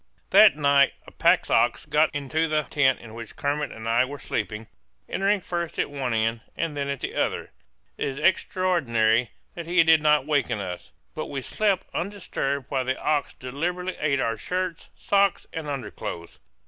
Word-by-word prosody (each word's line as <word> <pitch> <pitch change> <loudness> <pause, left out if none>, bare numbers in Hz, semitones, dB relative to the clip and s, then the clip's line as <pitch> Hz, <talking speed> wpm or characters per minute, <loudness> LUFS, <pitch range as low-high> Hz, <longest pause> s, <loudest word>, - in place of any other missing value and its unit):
That 205 -2 +8
night 140 -2 +4
a - - -13
pack - - +3
ox - - +2
got 155 +1 +3
into 150 +3 0
the 155 -1 +1
tent 135 -2 +2
in 110 -2 -11
which 115 -1 -9
Kermit 145 +1 -1
and 110 0 -8
I 115 +2 +4
were 140 +3 -5
sleeping, 110 -4 -4 0.4
entering 200 +1 +1
first 170 -2 -4
at - - -1
one 135 -3 -2
end 115 0 0 0.2
and 165 -2 -2
then 140 -1 -2
at 140 -2 -3
the - - -3
other. - - -1 0.5
It - - 0
is 135 -1 -4
extraordinary 140 -10 +2 0.2
that 170 -1 -7
he 175 0 +5
did 160 -1 +5
not 150 -2 +3
waken 140 -7 0
us; 90 -3 -6 0.2
but - - -4
we 135 -2 -5
slept 205 +3 0
undisturbed 170 -8 -3
while 130 - +1
the 130 +1 -1
ox 145 -5 0
deliberately 175 +8 -3
ate 145 -2 +1
our 115 -1 0
shirts, 180 +6 -3
socks, 200 -1 +1
and 160 -2 -5
underclothes! 115 -10 -6
145 Hz, 175 wpm, -25 LUFS, 125-170 Hz, 0.5 s, That